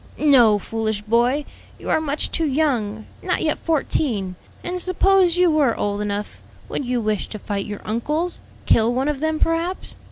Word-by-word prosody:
"No, 245 -8 +5
foolish 220 0 -3
boy, 240 +6 +2 0.3
you - - -10
are - - +3
much 295 -1 -2
too 325 -2 0
young, 245 -8 0 0.2
not 365 - 0
yet 310 - 0
fourteen. 260 - -1 0.3
And 360 0 -2
suppose 370 -1 +3
you 360 -2 +4
were 285 -7 +2
old 205 0 -1
enough, 205 0 -4 0.3
would - - -2
you 245 0 0
wish 215 -2 -1
to 215 - -7
fight 200 -1 -4
your 205 -1 -6
uncles? 300 +11 -2 0.2
kill 225 +1 +4
one 260 +4 0
of 295 -3 -2
them, 315 +1 0
perhaps? 335 +3 -1
265 Hz, 170 wpm, -22 LUFS, 215-315 Hz, 0.3 s, No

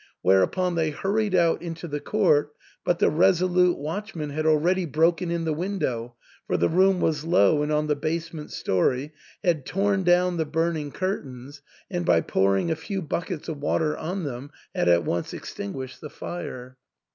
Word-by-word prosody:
Whereupon 95 - +3
they 160 -2 +1
hurried 195 +6 0
out 170 -2 +3
into 165 0 -6
the 145 -1 -3
court, 150 -7 +2 0.3
but 175 - +1
the - - +3
resolute 180 +1 +3
watchman 160 0 -5
had 155 +2 -1
already 170 +5 +3
broken 165 +4 +2
in 170 -1 -1
the 160 - 0
window, 140 -10 -3 0.3
for - - +1
the - - +2
room 185 +2 +4
was 155 -2 +1
low 165 -3 +4
and 150 +1 -1
on 150 0 +1
the 150 -1 +1
basement 155 +1 -4
story, 130 - 0 0.3
had 170 -7 +1
torn 195 +3 0
down 180 0 +3
the 160 - 0
burning 160 -1 -1
curtains, 140 -7 -5 0.3
and 90 - -2
by 85 -1 +4
pouring 95 - +1
a - - +1
few 195 +5 -4
buckets 170 +1 -4
of 160 -3 -4
water 150 +1 +1
on 180 +4 -4
them 135 -1 -5 0.2
had - - +1
at 85 0 +4
once 85 - -2
extinguished 130 +5 -7
the 150 - -7
fire. 130 -6 -7
160 Hz, 170 wpm, -25 LUFS, 145-180 Hz, 0.3 s, room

